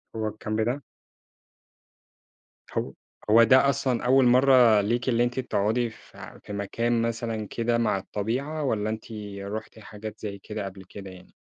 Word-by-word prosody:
هو 110 -1 -1
الكامب 110 +1 -3
ده؟ 125 +6 -1 1.9
هو - - -2 0.4
هو 115 +2 +7
ده 130 +4 +5
أصلًا 135 -3 0
أول 130 +1 +5
مرّة 125 -4 +6
ليكِ 120 +5 0
اللي 120 0 +3
أنتِ 120 +2 -1
تقعدي 115 0 0
في - - -13
في 105 - -8
مكان 115 +4 -1
مثلًا 115 -2 -3
كده 115 +2 0
مع 110 -4 +1
الطبيعة، 125 +11 -3
والَّا 110 -5 0
أنتِ 110 0 -5 0.4
رُحتِ 110 +2 -6
حاجات 110 0 -9
زي 100 -2 -6
كده 105 +1 -6
قبل 95 0 -8
كده 95 +1 -10
يعني؟ 90 0 -15
110 Hz, 150 wpm, -26 LUFS, 105-120 Hz, 1.9 s, هو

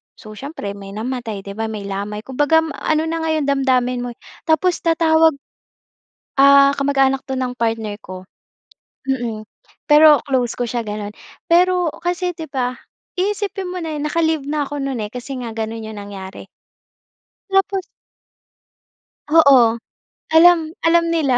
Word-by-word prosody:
So, 215 - -13
siyempre 215 -2 -7
may 200 0 -10
namatay, 225 -3 -4
'di 200 - -8
ba 225 - -1
may 215 -2 -6
lamay, 200 +2 -5
kumbaga 290 +5 +2
ma 320 - -5
ano 310 0 +1
na 325 +1 -2
nga 320 0 -2
'yung 310 - 0
damdamin 260 -3 +1
mo 245 0 -4
eh, - - -53 0.3
tapos 340 +3 +2
tatawag 325 -2 +3 1.0
ah, 280 0 +7
kamag-anak 270 -1 +2
'to 265 - -3
ng 255 -1 -2
partner 225 -2 -2
ko. 185 -3 -10 0.8
Mm, 235 -5 -3 0.4
pero 300 0 +7
close 255 -4 -1
ko 245 - -1
siya, 235 +1 -2
ganon. 210 -1 -6 0.3
Pero, 355 -1 +3
kasi 355 0 -2
'di 320 -1 -8
ba, 250 -2 -2 0.4
iisipin 390 -1 -2
mo 365 - -4
na 325 -3 -4
'yun 295 - -4
naka-leave 320 -2 +1
na 295 -1 -1
ako 290 0 -5
non, 270 -2 -3
eh, 210 -1 -4
kasi 255 +2 -6
nga 235 -3 -6
gano'n 225 0 -4
'yong 220 -1 -8
nangyari. 195 -1 -9 1.0
Tapos 390 0 +1 1.5
Oo, 270 -8 +6 0.5
alam 325 0 +5 0.2
alam 335 0 +4
nila. 300 -7 +2
275 Hz, 150 wpm, -19 LUFS, 225-320 Hz, 1.5 s, ah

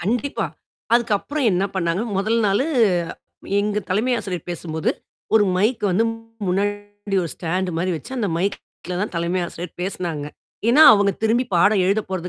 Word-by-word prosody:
கண்டிப்பா. 245 +9 -1 0.5
அதுக்கப்புறம் 240 +5 +1
என்ன 180 +2 +1
பண்ணாங்க? 175 +1 0
முதல் 215 +4 +1
நாளு 200 +6 +2 1.0
எங்க 210 0 0
தலைமை 220 +7 +1
ஆசிரியர் 180 -5 -5
பேசும்போது 160 -2 -2 0.4
ஒரு 215 -2 +6
மைக் 215 +6 +1
வந்து 200 +5 +2 0.4
முன்னாடி 205 +1 -2
ஒரு 170 - -4
ஸ்டாண்ட் 180 +2 -2
மாரி 185 +2 0
வச்சு, - - -10
அந்த 210 -4 0
மைக்ல 180 -1 -4
தான் 210 - -2
தலைமை 170 +2 0
ஆசிரியர் 170 0 -8
பேசினாங்க. 175 -5 -3 0.4
ஏன்னா, 275 +7 +7
அவங்க 200 -1 +2
திரும்பி 230 +3 +2
பாடம் 195 +3 +4
எழுதப் 200 +2 0
போறது 180 -2 -3
195 Hz, 145 wpm, -22 LUFS, 180-215 Hz, 1.0 s, ஏன்னா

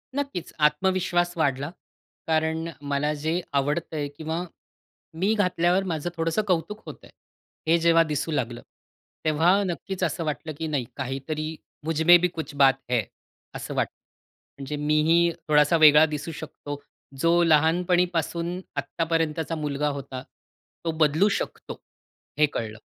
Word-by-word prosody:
नक्कीच, 280 - -4
आत्मविश्वास 175 +3 +2
वाढला. 140 -2 0 0.6
कारण 160 0 0 0.2
मला 145 +1 +1
जे 160 +4 0 0.2
आवडतंय 150 +1 -2
किंवा 160 +2 -3 0.8
मी 205 +3 +3
घातल्यावर 180 -2 +2
माझं 160 +1 -2
थोडंसं 165 +4 +1
कौतुक 185 +4 -1
होतंय. - - -11 0.6
हे 165 +1 +5
जेव्हा 165 0 +5
दिसू 155 0 -2
लागलं. 120 -5 -2 0.6
तेव्हा 165 +6 +3
नक्कीच 185 +1 -4
असं 165 -1 -1
वाटलं 155 +1 -3
की 160 - -3
नाही 145 -5 -1
काहीतरी 150 +4 -4 0.3
मुझमे 160 +2 +6
भी - - +5
कुछ 160 -4 -6
बात 135 -1 +5
है. 120 -3 +2 0.5
असं - - -5
वाटलं. - - -2 0.6
म्हणजे 140 +2 -5
मीही 155 +3 +3 0.2
थोडासा 150 +2 +4
वेगळा 150 +1 +8
दिसू 155 +1 -4
शकतो. 145 -2 -7 0.4
जो 170 +3 +4
लहानपणीपासून 170 +1 +2 0.2
आत्तापर्यंतचा 165 +2 -1
मुलगा 150 -1 -1
होता, 130 -2 -7 0.6
तो 165 - +1
बदलू 155 +6 +4
शकतो - - -7 0.6
हे 150 - +7
कळलं 110 -1 -4
160 Hz, 125 wpm, -25 LUFS, 150-170 Hz, 0.8 s, वेगळा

